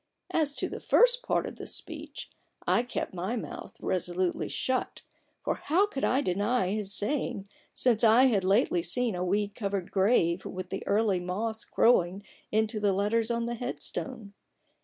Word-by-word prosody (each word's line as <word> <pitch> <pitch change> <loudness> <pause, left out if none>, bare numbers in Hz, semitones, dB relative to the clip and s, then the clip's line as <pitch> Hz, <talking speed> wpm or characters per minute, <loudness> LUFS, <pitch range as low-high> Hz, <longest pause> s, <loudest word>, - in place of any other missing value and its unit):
" - - -18
As 290 -2 -1
to - - 0
the - - -6
first - - +5
part - - 0
of - - -7
this - - -5
speech - - -6 0.3
I - - +3
kept 245 -5 -4
my 185 +6 -2
mouth 230 - -7
resolutely 180 0 -1
shut; 260 -1 -2 0.4
for - - +1
how 360 +7 +4
could 345 -10 -5
I 260 +3 +3
deny 200 0 0
his 205 -1 -2
saying, 210 -2 -1 0.3
since 240 -3 +2
I 230 +3 +7
had 220 -8 +3
lately 190 -2 +3
seen 245 +5 0
a 180 0 -2
weed 200 +2 0
covered 200 -4 -3
grave 190 -3 +2
with 185 0 -6
the 195 - -3
early 205 -2 +2
moss 215 +5 -3
growing 195 -4 +3 0.3
into 215 0 +1
the 205 -2 +2
letters 215 +4 +1
on 235 0 0
the 240 - -2
headstone 240 -2 -5
210 Hz, 170 wpm, -29 LUFS, 190-245 Hz, 0.4 s, I